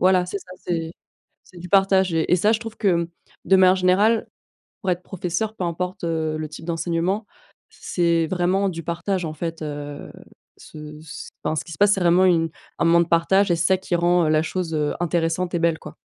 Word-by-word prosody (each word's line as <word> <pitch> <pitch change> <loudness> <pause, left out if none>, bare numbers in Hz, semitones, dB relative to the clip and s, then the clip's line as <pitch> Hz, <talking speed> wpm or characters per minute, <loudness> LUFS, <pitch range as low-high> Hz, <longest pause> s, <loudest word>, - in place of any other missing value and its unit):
voilà, 185 -1 +4
c'est 200 - -4
ça, 185 -1 -13
c'est 165 -2 -2 0.5
c'est 185 - -19
du 180 +1 -9
partage, 190 -2 +3
et 165 +2 +2
ça 210 +5 +3
je 220 - 0
trouve 225 -1 -8
que, 205 - +1
mmh, 170 0 -1 0.4
de 190 - +5
manière 185 0 +6
générale 200 +5 +3 0.5
pour 190 - 0
être 180 0 -1
professeur, 190 +4 -3
peu 180 - -3
importe, 180 +2 -3
heu, 160 -2 -1
le 155 0 -4
type 150 +1 -10
d'enseignement, 170 +5 -1 0.4
c'est 170 -2 0
vraiment 185 +2 +1
du 165 -2 -6
partage, 175 +2 -2
en 155 - -5
fait. 165 0 -5
Heu, 145 -1 -6 0.5
ce 150 0 -11
ce, 160 - -9
enfin 155 - -1
ce - - -2
qui 170 - -10
se 150 - -9
passe 205 0 +5
c'est 195 - -3
vraiment 175 +1 +4
une 165 -3 +2 0.3
un - - +1
moment 170 +1 +5
de 170 - 0
partage, 190 +4 +3
et 170 - +3
c'est 165 - -1
ça 190 - +4
qui 185 -1 -3
rend, 175 0 +3
heu, 155 - +1
la 155 0 +3
chose, 170 -1 -3
heu, 150 -1 0
intéressante 175 +1 -1
et 175 - +2
belle, 165 -1 +2
quoi. - - -11
175 Hz, 220 wpm, -22 LUFS, 165-185 Hz, 0.5 s, manière